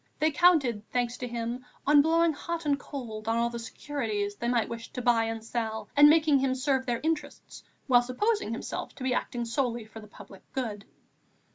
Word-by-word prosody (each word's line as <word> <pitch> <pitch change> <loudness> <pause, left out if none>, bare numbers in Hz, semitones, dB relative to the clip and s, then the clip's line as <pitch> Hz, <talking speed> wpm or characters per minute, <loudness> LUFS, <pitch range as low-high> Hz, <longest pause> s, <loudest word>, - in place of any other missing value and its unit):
They 310 +1 +2
counted, 290 -9 +4
thanks 245 -1 -1
to 250 - -4
him, 235 +1 -4 0.2
on 290 0 +7
blowing 330 +2 +3
hot 335 +3 -5
and 285 -1 +1
cold 230 -6 -7
on 225 +1 +1
all 235 0 +1
the 235 - -5
securities 225 -4 -3
they 235 - -4
might 240 -2 +1
wish 230 0 -7
to - - -4
buy 235 -2 +3
and 225 0 -4
sell, 225 -1 -3
and 290 +1 +9
making 305 -2 +4
him 260 -1 +1
serve 265 0 0
their 240 -1 -1
interests 320 -1 -4 0.2
while 245 -2 +5
supposing 255 - -1
himself 230 - -5
to 260 - -8
be 260 -1 +1
acting 240 -1 -2
solely 235 -1 -1
for 220 +1 -11
the 215 - -12
public 195 -2 -14
good. 215 -6 -4
245 Hz, 200 wpm, -28 LUFS, 230-285 Hz, 0.2 s, and